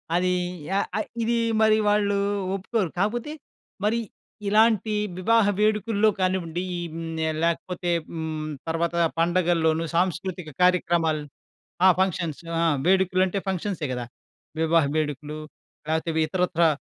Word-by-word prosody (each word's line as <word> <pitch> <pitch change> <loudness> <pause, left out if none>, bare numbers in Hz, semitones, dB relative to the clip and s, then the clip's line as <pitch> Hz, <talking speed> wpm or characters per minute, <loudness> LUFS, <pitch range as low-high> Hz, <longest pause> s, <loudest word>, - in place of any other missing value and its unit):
అది 180 +1 +2 0.4
య - - -2 0.2
ఆహ్, 215 - -1 0.2
ఇది 235 +1 +1 0.2
మరి 220 0 +5
వాళ్ళు 205 -1 +2 0.4
ఒప్పుకోరు. 195 -1 -1
కాకపోతే, 235 +8 -1 0.5
మరి 220 +3 +2 0.5
ఇలాంటి 215 0 +3 0.3
వివాహ 225 +3 +4
వేడుకల్లో 215 0 +2
కానివ్వండి, 185 -2 -1 0.3
హ్మ్, 165 0 -5 0.2
య - - +1
లేకపోతే 175 +1 -1 0.2
హ్మ్, 160 -1 -4 0.2
తర్వాత 170 +1 -1 0.2
పండుగల్లోను 165 -2 +2
సాంస్కృతిక 180 -1 -1
కార్యక్రమాలు. 170 -4 +2 0.6
ఆ! - - +9
ఫంక్షన్స్ 175 -5 -1 0.5
వేడుకలు 185 0 +3
అంటే, 195 +2 -2
ఫంక్షన్సే 190 -3 -2
కదా 125 -1 -4 0.6
వివాహ 165 0 +4
వేడుకలు. 150 0 -3 0.5
లేకపోతే, 160 +1 0 0.2
ఇతరత్రా 175 -1 +2
180 Hz, 110 wpm, -25 LUFS, 165-205 Hz, 0.6 s, ఆ